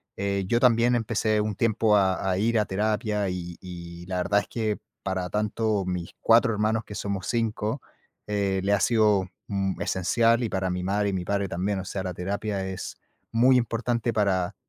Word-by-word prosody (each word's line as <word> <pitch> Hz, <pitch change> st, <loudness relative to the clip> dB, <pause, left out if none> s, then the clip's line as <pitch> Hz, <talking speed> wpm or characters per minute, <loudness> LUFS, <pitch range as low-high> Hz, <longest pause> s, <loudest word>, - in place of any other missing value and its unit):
eh, 100 Hz, -1 st, -1 dB
yo 120 Hz, +2 st, +2 dB
también 120 Hz, 0 st, +4 dB
empecé 110 Hz, -1 st, +1 dB
un 105 Hz, 0 st, -1 dB
tiempo 110 Hz, -1 st, +2 dB
a 95 Hz, -1 st, +2 dB
a 90 Hz, -, 0 dB
ir 115 Hz, +2 st, +2 dB
a 105 Hz, -, +2 dB
terapia, 105 Hz, 0 st, 0 dB
y 90 Hz, -1 st, -5 dB
y 85 Hz, -1 st, -9 dB
la 90 Hz, -1 st, -2 dB
verdad 100 Hz, +3 st, +2 dB
es -, -, -6 dB
que 110 Hz, -3 st, -2 dB, 0.3 s
para 95 Hz, -2 st, -2 dB
tanto 105 Hz, 0 st, 0 dB
mis 90 Hz, -2 st, -3 dB
4 115 Hz, +1 st, +5 dB
hermanos, 110 Hz, +2 st, 0 dB
que 105 Hz, -, -9 dB
somos 100 Hz, -5 st, -3 dB
5, 115 Hz, -, -1 dB, 0.4 s
eh, 100 Hz, -2 st, 0 dB
le 100 Hz, +1 st, +2 dB
ha 100 Hz, -, +3 dB
sido 105 Hz, -5 st, +3 dB, 0.2 s
mm, 95 Hz, -1 st, -1 dB
esencial 115 Hz, +6 st, +2 dB
y 110 Hz, -, -1 dB
para 95 Hz, -1 st, -1 dB
mi 90 Hz, 0 st, -2 dB
madre 100 Hz, +2 st, +1 dB
y -, -, -2 dB
mi 90 Hz, -1 st, -2 dB
padre 100 Hz, +1 st, -1 dB
también, 95 Hz, +3 st, -1 dB
o 95 Hz, -, -6 dB
sea, 95 Hz, +1 st, -4 dB
la 90 Hz, -2 st, -4 dB
terapia 100 Hz, +1 st, -2 dB
es 95 Hz, 0 st, -6 dB, 0.4 s
muy 125 Hz, +3 st, +5 dB
importante 120 Hz, 0 st, 0 dB
para 95 Hz, -4 st, +1 dB
100 Hz, 190 wpm, -26 LUFS, 95-110 Hz, 0.4 s, 4